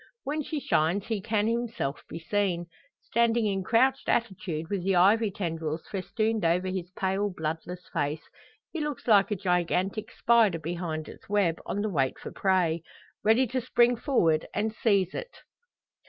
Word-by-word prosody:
When 300 +2 -2
she 300 +1 -3
shines 175 - +1
he 220 -3 -2
can 210 0 0
himself 230 - -2
be - - -6
seen. 175 0 -1 0.4
Standing 235 -1 +2
in 195 -2 0
crouched 260 +6 +2
attitude 185 -8 -1
with 195 -1 -2
the 190 0 +2
ivy 205 +5 +5
tendrils 165 -5 -3
festooned 215 +2 -1
over 175 +3 +2
his 185 -2 -4
pale, 195 +2 0
bloodless 165 +2 -5
face, 150 +2 -1 0.5
he 330 - -4
looks 295 -4 -4
like 205 -4 +5
a 210 - 0
gigantic 185 +3 0
spider 225 -7 +3
behind 165 -1 -4
its - - -13
web, 195 -5 +1
on 205 - -1
the 215 - -1
wait 135 -6 0
for - - -8
prey 180 -4 +1 0.4
ready 225 +5 +4
to 255 +2 -2
spring 245 0 +3
forward 175 - +1
and 215 +1 0
seize 200 -5 +1
it. - - -7
195 Hz, 160 wpm, -28 LUFS, 170-225 Hz, 0.5 s, ivy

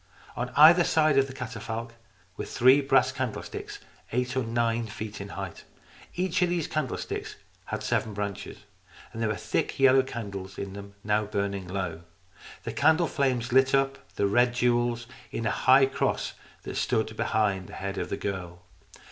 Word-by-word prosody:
On 125 +1 -3
either 165 +4 +8
side 155 -4 +3
of 135 - +2
the - - -8
catafalque 115 -2 -5 0.4
were - - -5
three 130 +4 +5
brass 135 -2 +3
candlesticks, 130 -4 -5 0.3
eight 125 +2 -1
or 130 - +2
nine 115 0 0
feet 110 -1 -7
in 100 - -7
height. 95 -3 -6 0.5
Each 185 +1 0
of 180 - +3
these 175 -3 -1
candlesticks 150 -5 -3 0.3
had - - -4
seven 110 -2 -1
branches. 100 -1 -4 0.6
There 115 0 -1
were 105 - 0
thick 90 - -2
yellow 135 0 +6
candles 100 -7 -6
in 100 -1 -5
them, 100 0 -10
now 105 0 +1
burning 100 -2 -2
low. 90 -3 -3 0.6
The - - -4
candle 160 +2 +4
flames 125 -6 0
lit 130 +1 +5
up 135 -7 -1
the 100 - +1
red 120 +4 +3
jewels 120 -1 +1 0.3
in 115 - -3
a 110 - +2
high 135 +3 +5
cross 135 - -1 0.3
that - - -5
stood 110 0 0
behind 100 -4 0
the - - -12
head 100 0 -4
of - - -3
the 100 - -2
girl. 90 -3 -5
115 Hz, 165 wpm, -27 LUFS, 100-130 Hz, 0.6 s, either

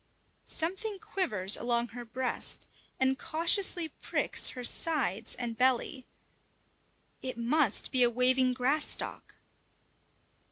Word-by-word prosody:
Something 385 +6 0
quivers 345 - +1
along 235 0 -1
her 245 +1 -9
breast 245 +2 -3 0.3
and 265 0 +1
cautiously 335 +1 +2
pricks - - 0
her 250 - -8
sides 235 - +1
and 240 -2 -5
belly. 255 +1 0 1.1
It 255 -2 -5
must 240 0 +1
be 255 - +2
a 240 - +5
waving 255 +1 +2
grass 270 +5 +1
stalk! - - -4
255 Hz, 110 wpm, -29 LUFS, 240-315 Hz, 1.1 s, a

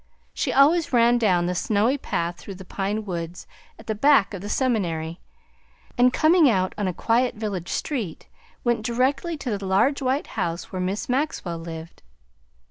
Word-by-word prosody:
She - - -1
always 310 +5 +4
ran 240 -1 +4
down 180 -6 +2
the 180 - -1
snowy 215 +7 +1
path 170 -10 -3
through 195 - -9
the 190 0 -11
pine 205 +3 -3
woods 170 -2 -5 0.3
at - - -14
the 220 - -1
back 230 -2 +4
of 195 - -6
the 205 - -6
seminary, 175 -11 -1 0.7
and 250 +1 +4
coming 315 +1 +5
out 185 -4 +1
on 205 -2 -2
a - - 0
quiet 240 +7 +1
village 200 -5 -4
street, 225 - -3 0.4
went 235 -3 +1
directly 265 +8 0
to 250 -6 -3
the 200 - -7
large 200 +10 +2
white 265 +2 0
house 170 +1 -3
where 185 -2 -3
Miss 190 +3 -2
Maxwell 250 - -2
lived. 165 0 -9
210 Hz, 170 wpm, -24 LUFS, 180-255 Hz, 0.7 s, coming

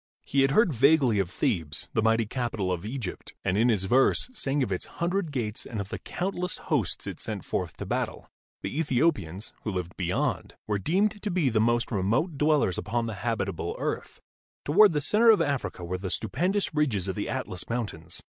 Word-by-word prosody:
He 140 - +2
had 135 - +4
heard 180 +3 +4
vaguely 135 -3 +4
of 95 -3 0
Thebes, 80 -5 0
the 110 - +2
mighty 115 +1 +3
capital 115 -5 -2
of 90 -2 -2
Egypt, 120 -5 -6
and 95 -1 +1
in 115 +4 +4
his 105 -5 +2
verse 130 - +4
sang 140 - 0
of 115 - -3
its 90 - -2
hundred 175 -1 0
gates 115 -5 -3
and 110 - -5
of 100 -1 -4
the - - -5
countless 180 0 -3
hosts - - -1
it - - -6
sent - - -5
forth - - -3
to - - -5
battle. - - -3 0.4
The 150 - -3
Ethiopians, 125 - 0
who - - -3
lived 90 -2 -4
beyond, 90 -1 -1
were 105 -1 -1
deemed 200 - +1
to 210 - -2
be 175 -7 +2
the 110 -2 +2
most 120 +2 +1
remote 115 - +1
dwellers 150 - +2
upon 115 +2 -1
the 115 - -3
habitable 100 -7 -2
earth. - - -4 0.5
Toward 200 +6 +6
the 150 - +1
center 215 +10 +4
of 220 - +7
Africa 105 -11 -1
were 90 +1 -3
the 95 0 -4
stupendous 175 - 0
ridges 125 - +1
of 95 - -2
the - - -3
Atlas 90 - -3
Mountains. 100 -9 -4
120 Hz, 195 wpm, -27 LUFS, 100-150 Hz, 0.5 s, of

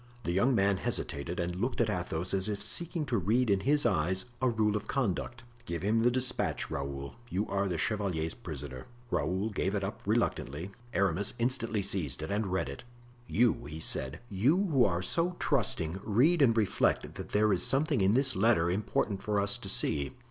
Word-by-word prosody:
The 85 - -1
young 120 +9 +3
man 100 -1 +3
hesitated 85 +2 -2
and 85 0 -2
looked 120 +8 -2
at 115 - +3
Athos 90 -3 -2
as 95 +2 +1
if 100 -1 -3
seeking 170 -2 -1
to 120 -6 0
read 110 +5 +2
in 100 - +3
his 145 +8 +2
eyes 95 +5 +1 0.2
a 130 - +3
rule 110 -2 +1
of 105 - -3
conduct. 120 -1 -2 0.2
"Give 85 0 -4
him 110 +3 +2
the 120 - +4
despatch, 125 +1 -1
Raoul! 70 0 -4 0.2
you 100 +1 -1
are 100 0 0
the 85 - -1
chevalier's 80 -1 -1
prisoner." 65 -3 -7 0.2
Raoul 90 +6 0
gave 95 0 -1
it 100 - -1
up 100 - -4
reluctantly; 95 - -1 0.2
Aramis 100 -1 +1
instantly 115 -4 0
seized 75 -8 -1
and 100 +6 -1
read 95 0 -1
it. - - -7 0.4
"You," 120 -1 +3
he 75 +2 -7
said, 65 -3 0
"you, 120 - +2
who 130 -4 +5
are 85 -2 0
so 170 - 0
trusting, 95 - 0
read 145 - +3
and 115 -4 +4
reflect 105 -3 +1
that - - -8
there 105 0 +3
is - - +1
something 140 -3 +1
in 95 +3 +3
this 135 0 +3
letter 95 -5 +3
important 100 0 -1
for 105 -1 0
us 100 0 +3
to - - -6
see." 70 -1 0
100 Hz, 190 wpm, -30 LUFS, 90-120 Hz, 0.4 s, who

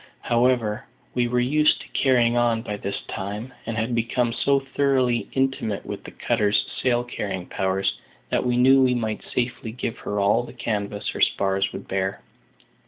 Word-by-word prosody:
However, 120 -3 +1 0.3
we 120 -1 +1
were 125 +1 +1
used 150 +5 +3
to - - -11
carrying 120 -3 +3
on 120 -2 +2
by 105 - -4
this 100 0 -4
time, 105 +6 -5
and 115 -1 -3
had 115 +2 -1
become 115 +1 0
so 140 +3 +2 0.2
thoroughly 130 -4 +2
intimate 130 -6 -1
with - - -6
the - - -7
cutter's 105 -3 +1 0.2
sail 120 -1 +2
carrying 100 -6 -4
powers 95 +1 -1 0.3
that - - +1
we 125 -1 +1
knew 135 +2 +6
we 125 -1 +4
might 110 -3 -2
safely 120 -2 -3
give 115 0 -4
her 105 - -3
all 100 +4 +3
the 120 - -10
canvas 105 -4 -3
her - - -4
spars 95 0 +2
would - - -8
bear. 95 0 -2
120 Hz, 170 wpm, -24 LUFS, 105-125 Hz, 0.3 s, knew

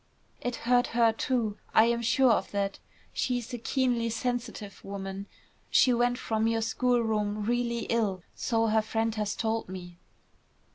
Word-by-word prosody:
"It 245 -1 -2
hurt 245 0 +4
her, 230 -1 +5
too; 225 -3 -1 0.2
I 220 - +8
am 235 0 +1
sure 255 +2 +4
of 220 - +1
that. 200 -1 -2 0.3
She 250 -1 0
is 240 0 -6
a 245 - -3
keenly 245 -1 +1
sensitive 230 -3 -4
woman. 195 0 -6 0.4
She 255 - +5
went 245 +1 +2
from 220 -3 0
your 225 0 +1
schoolroom 220 -3 +1
really 235 0 0
ill, 205 -7 0
so 225 -1 0
her 220 0 +3
friend 225 +1 -1
has 210 -2 -2
told 225 -2 -1
me." 175 -2 -8
225 Hz, 155 wpm, -29 LUFS, 210-240 Hz, 0.4 s, I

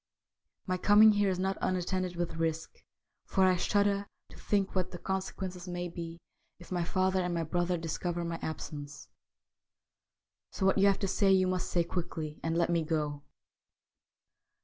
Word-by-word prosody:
My 185 -1 -1
coming 210 +3 +7
here 205 -1 +2
is 185 - 0
not 190 +1 -1
unattended 185 0 -1
with 170 -1 -3
risk, 160 0 -2 0.5
for 190 - +2
I 185 -1 +5
shudder 200 +2 +1 0.2
to - - -14
think 200 -2 0
what 185 -1 0
the 180 - -7
consequences 190 -1 -4
may 175 0 -3
be 170 -1 -7 0.4
if 175 - -15
my 175 -1 0
father 185 +2 +1
and 180 -1 -1
my 165 - 0
brother 175 +2 0
discover 170 +1 -3
my 170 0 -3
absence. 145 -1 -6 1.4
So 190 - -2
what 195 +1 +3
you 200 - +6
have 195 - +4
to 195 - +1
say 195 +1 +3
you 190 -1 +5
must 185 -1 -1
say 175 - +2
quickly, 165 -3 -4
and 165 0 -1
let 175 0 +2
me 170 -1 +2
go.' 150 -2 -2
180 Hz, 170 wpm, -31 LUFS, 165-190 Hz, 1.4 s, coming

